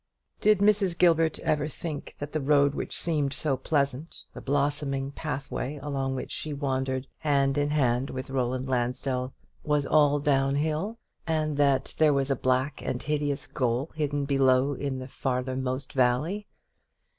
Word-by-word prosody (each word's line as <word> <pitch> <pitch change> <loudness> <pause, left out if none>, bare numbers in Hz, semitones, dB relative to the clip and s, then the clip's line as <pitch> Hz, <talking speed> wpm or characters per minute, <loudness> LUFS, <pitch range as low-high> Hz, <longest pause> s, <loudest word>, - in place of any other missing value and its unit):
Did 210 -2 +4
Mrs. 200 -4 +3
Gilbert 165 -3 +4
ever 150 -1 +1
think 150 0 -6
that 145 0 -6
the 155 - -1
road 140 0 +4
which - - -3
seemed 150 -5 0
so 140 -1 0
pleasant, 140 +2 -1
the - - -8
blossoming 140 -1 -1
pathway 145 -1 -4
along 135 -2 -2
which 130 - -5
she 155 - -3
wandered 130 -2 -1
hand 140 -2 +2
in 145 0 +1
hand 130 -3 +1
with 130 +1 -6
Roland 130 0 -1
Lansdell, 125 +1 -1 0.3
was 150 -1 +1
all 145 -1 +4
downhill, 150 +8 +1 0.3
and 155 -2 0
that 140 -2 +2
there 155 -2 +5
was 135 0 +1
a - - +3
black 130 +3 0
and 125 - -3
hideous 145 -1 -1
goal 125 +2 -1
hidden 145 -2 -1
below 135 0 +3
in 140 -1 -3
the 130 0 -6
farther 130 -1 -2
most 130 +1 -3
valley? 140 +11 +1
140 Hz, 155 wpm, -27 LUFS, 130-150 Hz, 0.3 s, there